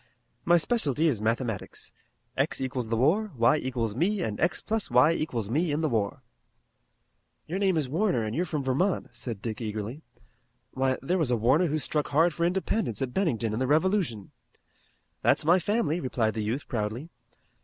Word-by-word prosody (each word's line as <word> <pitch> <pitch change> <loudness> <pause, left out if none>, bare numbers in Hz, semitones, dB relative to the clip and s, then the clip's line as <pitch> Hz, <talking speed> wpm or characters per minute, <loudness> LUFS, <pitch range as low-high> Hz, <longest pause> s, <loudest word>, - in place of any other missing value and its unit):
My 175 0 +5
specialty 160 - +1
is 130 -10 +1
mathematics. 115 -2 -3 0.4
X - - 0
equals 130 -3 -3
the 115 - 0
war, 195 - +2
y 120 +5 +4
equals 120 -6 -2
me 185 - 0
and 105 -2 -3
x - - +1
plus 220 -1 -2
y 125 +6 +5
equals 125 -10 -2
me 155 - 0
in 150 +2 0
the 155 - +1
war." 105 -4 -1 1.2
"Your 175 +5 -3
name 190 -4 +2
is 150 -4 0
Warner 165 - +1
and 110 0 -3
you 170 - +1
are - - 0
from 155 -4 -3
Vermont," 135 +3 0
said 120 -4 -6
Dick 115 -1 -4
eagerly. 110 +5 -4 0.7
"Why, 130 0 0
there 180 +7 0
was 155 -6 +1
a 120 - +2
Warner 130 +11 +3
who 155 0 0
struck 150 0 -1
hard 160 +4 +3
for 170 +2 +1
independence 185 - -1
at 125 -2 -4
Bennington 120 - 0
in 110 - -2
the 130 - 0
Revolution." 155 - +1 0.9
"That's - - +3
my 175 +4 +5
family," 180 -4 0
replied 120 -7 0
the 110 - -3
youth 120 +7 -3
proudly. 115 +7 -3
135 Hz, 185 wpm, -27 LUFS, 115-170 Hz, 1.2 s, My